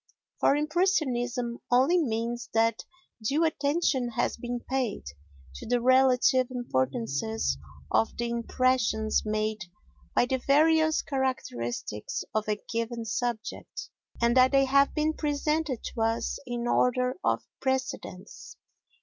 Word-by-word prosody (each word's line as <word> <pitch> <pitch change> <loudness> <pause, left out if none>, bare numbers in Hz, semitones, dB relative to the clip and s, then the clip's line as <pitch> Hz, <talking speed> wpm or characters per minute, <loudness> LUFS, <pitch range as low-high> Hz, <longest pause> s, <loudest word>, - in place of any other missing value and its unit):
For - - +4
impressionism 275 - 0
only 265 +9 +4
means 235 -3 -2
that 225 0 +2 0.4
due 285 +9 +1
attention 290 -4 +1
has - - 0
been 240 +1 -4
paid 255 -4 -2 0.5
to - - -9
the 245 +1 +2
relative 255 0 +4
importances 140 - -1 0.3
of 110 +1 +1
the 240 - -1
impressions 235 -2 +1
made 215 -1 -2 0.5
by - - +4
the 260 +1 -1
various 315 +3 +3
characteristics 120 - -3
of 215 0 -1
a 210 - +2 0.2
given 230 0 -2
subject, 235 0 -4 0.3
and 235 +1 +2
that 255 0 +6
they 275 0 +5
have 275 +1 +4
been 310 0 +1
presented 300 -2 -1
to 230 - -4
us 225 +1 0
in 240 -1 -3
order 250 +1 +2
of - - +1 0.2
precedence. 260 -7 -4
245 Hz, 120 wpm, -28 LUFS, 225-275 Hz, 0.5 s, that